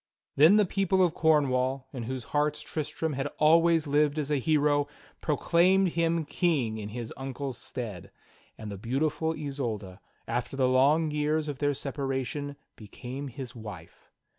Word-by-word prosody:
Then 160 +8 +7
the 210 -1 +5
people 190 0 +2
of 170 - -1
Cornwall, 135 -4 +2
in 125 - -5
whose 130 -2 -4
hearts 150 0 +1
Tristram 155 0 -3
had 135 +1 -2
always 165 +1 +4
lived 145 +1 +2
as 150 -1 -2
a 145 - +3
hero, 145 0 +2 0.3
proclaimed 175 +5 +3
him 165 -1 0
King 140 - 0
in 105 -1 -5
his 115 +1 -6
uncle's 135 0 -5
stead; 110 -9 -6 0.5
and 110 -2 -7
the 100 - -7
beautiful 150 +7 -1
Isolda, 115 -10 -4 0.3
after 120 +3 -3
the 130 -1 +3
long 145 +5 +3
j'cars 150 +1 0
of 145 -3 -5
their 145 -1 +1
separation, 140 +1 -3 0.2
became 125 +6 -7
his 130 -1 -7
wife. 105 -8 -10
145 Hz, 150 wpm, -28 LUFS, 125-155 Hz, 0.5 s, Then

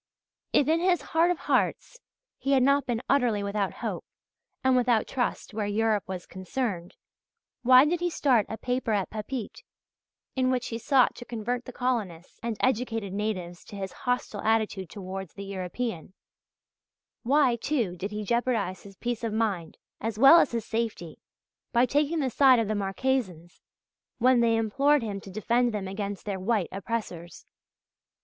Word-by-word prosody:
If 285 - +3
in 320 +2 +3
his 360 0 +2
heart 330 +2 +4
of 355 - +1
hearts - - -1 0.4
he 275 - 0
had 260 -2 +4
not 280 +1 +3
been 240 -1 -2
utterly 245 -7 +2
without 200 -1 -1
hope - - -3 0.6
and 260 0 +4
without 245 -3 +3
trust 245 -3 -2
where 210 -1 -2
Europe 215 0 +1
was 185 -2 -5
concerned, 185 -2 -4 0.7
why 255 +2 +7
did 340 +3 0
he 350 0 0
start 255 -9 +2
a 220 - -4
paper 250 -2 -1
at 200 -3 -1
Papeete, 220 - -5 0.7
in 255 -1 +2
which 255 -2 -1
he 230 - -4
sought 260 +2 +3
to - - -7
convert 240 +2 -3
the 255 - -7
colonists 215 -10 -3
and 230 -2 -3
educated 225 -5 0
natives 185 -4 -3
to - - -11
his 195 -1 -5
hostile 245 -4 -2
attitude 215 -4 0
towards 190 -3 -7
the 200 - -7
European? 185 -1 -4 1.1
Why, 265 -1 +3
too, 235 -7 -1
did 185 +3 -4
he 210 0 -4
jeopardize 220 -5 0
his 195 -1 -14
peace 240 -1 -3
of 225 - -1
mind 200 -7 -1 0.2
as 220 0 -3
well 275 +8 +9
as 295 - +3
his 230 -2 -3
safety, 220 -8 -3 0.5
by 240 +1 +5
taking 295 +4 +1
the 260 -2 -1
side 265 0 +6
of 225 -2 +1
the 215 - 0
Marquesans 195 -4 -2 0.6
when 250 +1 +4
they 230 -1 +3
implored 270 +6 +2
him 200 -3 -4
to 195 - -11
defend 235 +5 +1
them 195 -2 -3
against 200 0 -5
their 200 -2 -3
white 200 -2 0
oppressors? 190 -4 -5
225 Hz, 165 wpm, -27 LUFS, 200-255 Hz, 1.1 s, well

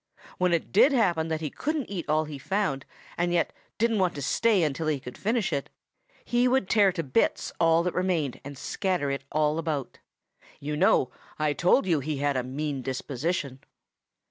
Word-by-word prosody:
When 180 -1 +2
it 170 -2 0
did 275 +8 +5
happen 175 -10 +2
that 160 -1 -2
he 155 - -3
couldn't 305 -3 -2
eat 175 -6 -4
all 155 +1 +3
he 150 -2 -7
found 170 -6 -1 0.3
and 175 0 +1
yet 175 -1 +1 0.2
didn't 225 -1 +2
want 180 -2 +1
to 145 - -5
stay 215 - +3
until 155 +1 -1
he 150 -3 +1
could 125 -1 -9
finish 220 -1 0
it, 140 - -2 0.6
he 245 +1 +2
would 250 -6 +2
tear 200 -2 +4
to 165 -3 -2
bits 135 -3 0
all 165 0 +4
that 180 - -1
remained 175 -8 -1
and 140 0 -8
scatter 180 -4 -1
it 140 0 -4
all 155 +1 +1
about. 155 -5 -3 0.6
You 150 +1 -3
know 150 -6 +3 0.3
I 155 -1 +1
told 180 - +3
you 170 -5 +2
he 145 +1 -3
had 145 0 0
a 130 - +1
mean 140 +2 -3
disposition. 135 +2 -3
160 Hz, 190 wpm, -27 LUFS, 140-190 Hz, 0.6 s, did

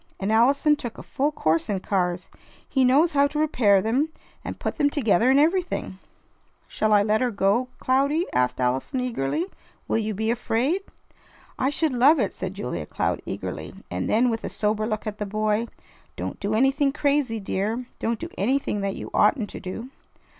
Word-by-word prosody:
And 195 +2 -1
Allison 275 +7 +4
took 240 -5 -7
a - - -9
full 285 +3 -1
course 160 - 0
in 200 -2 0
cars. 180 -2 -1 0.4
He 265 - +2
knows 285 +7 +4
how 285 -1 +4
to 300 - -6
repair 225 -11 +3
them, 260 +8 +1 0.3
and - - -6
put - - -3
them 290 -1 +4
together, 245 - +2
and 270 +1 +5
everything." 335 - 0 0.7
"Shall 215 - 0
I 205 -1 +5
let 215 +2 +1
her 250 - +2
go, 205 +4 +1
Cloudy?" 280 +6 +1
asked 125 0 +1
Allison 130 - 0
eagerly. 250 - -1 0.4
"Will - - +1
you 215 -1 -2
be 220 +3 0
afraid?" 245 +9 0 0.8
"I 265 - +2
should 295 0 0
love 270 +6 +5
it," 205 - 0
said 190 0 -5
Julia 90 - -4
Cloud - - -1
eagerly, - - -5 0.2
and 90 +1 -2
then 240 +3 +3
with 225 - -3
a - - -3
sober 215 0 -1
look 215 -2 -3
at 210 -1 -5
the 210 - -3
boy: 215 +2 0 0.5
"Don't - - -5
do 205 +2 -1
anything 270 +4 +3
crazy, 280 -5 0
dear! 215 +5 -2
Don't 230 0 -1
do - - -6
anything 225 -1 0
that 195 -1 -2
you - - -7
oughtn't 225 -9 +2
to - - -7
do." 225 +7 -7
225 Hz, 185 wpm, -24 LUFS, 205-275 Hz, 0.8 s, and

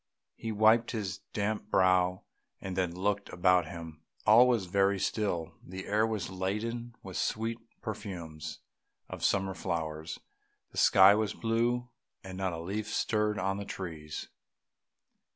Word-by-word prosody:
He 115 - -4
wiped 110 +2 +4
his 100 -4 -3
damp 105 0 -2
brow, 90 -2 +3 0.4
and 95 -1 -5
then 90 -2 0
looked 100 +2 -1
about 90 -1 +3
him; 80 -1 -8 0.2
all 115 +4 +8
was 120 -6 +2
very 100 +2 +2
still, 95 -5 -1
the 95 +1 -7
air 105 +2 +2
was 105 -5 -3
laden 115 +6 -3
with 95 -4 -6
the - - +1
sweet 115 +1 -2 0.2
perfumes 85 -7 -6 0.5
of - - -7
summer 95 -1 +2
flowers; 80 -2 -3 0.5
the - - -3
sky 95 +1 +8
was 105 -1 0
blue, 120 +2 0 0.3
and 95 -1 -7
not 95 -1 -1
a 85 - -5
leaf 100 +5 -3
stirred 105 -1 +1
on 95 +1 0
the 100 - -4
trees. 80 -6 -6
95 Hz, 145 wpm, -31 LUFS, 90-110 Hz, 0.5 s, all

